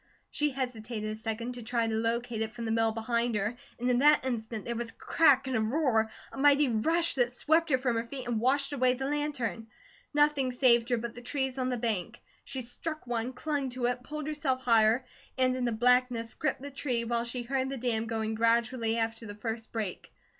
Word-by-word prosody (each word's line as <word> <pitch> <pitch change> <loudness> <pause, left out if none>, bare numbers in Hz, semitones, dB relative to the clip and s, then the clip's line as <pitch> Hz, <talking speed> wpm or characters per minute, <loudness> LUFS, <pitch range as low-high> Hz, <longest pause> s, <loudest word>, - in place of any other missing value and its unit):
She 300 0 +1
hesitated 235 -5 -4
a - - -4
second 225 +2 -4
to 245 - -8
try 235 0 0
to 225 - -1
locate 230 +1 -1
it 220 +1 -3
from 235 -1 -5
the 225 - -1
mill 225 0 +2
behind 235 +1 -1
her; 210 +3 -1 0.2
and 245 - -1
in 245 -1 +3
that 295 0 +5
instant 225 -4 -3
there 235 - -3
was 235 0 -3
a - - -11
crack 285 -4 +4
and 260 -1 -2
a 220 - +2
roar, 225 -2 +2 0.2
a - - -8
mighty 290 +1 +5
rush 325 +10 +2
that 245 -2 +1
swept 320 +6 +2
her 260 - +4
from 250 -3 0
her 230 +1 -2
feet 260 0 -6
and 235 -2 0
washed 275 +4 +1
away 255 -2 +3
the 265 +1 -4
lantern. 280 -6 -2 0.4
Nothing 295 -3 +3
saved 240 -2 +4
her 245 - +2
but 235 +1 -5
the 245 - -10
trees 265 +1 -2
on 255 0 0
the 250 - -1
bank. 225 -1 -2 0.2
She 265 -2 -5
struck 310 +6 -6
one, 240 0 -2
clung 285 0 -2
to 250 0 -2
it, 245 0 0
pulled 300 +3 -6
herself 285 -4 -1
higher, 230 +1 +4 0.3
and 255 0 +3
in 255 -1 -1
the 240 - +1
blackness 245 0 +2
gripped 290 -3 -2
the 285 - -6
tree, 255 -4 -1
while 235 0 0
she 240 +1 -4
heard 265 +1 -1
the 275 - -4
dam 230 -2 -1
going 220 -1 -2
gradually 230 +1 +1
after 225 0 -2
the 205 - -7
first 225 +1 -5
break. 215 -5 -4
245 Hz, 220 wpm, -30 LUFS, 225-265 Hz, 0.4 s, that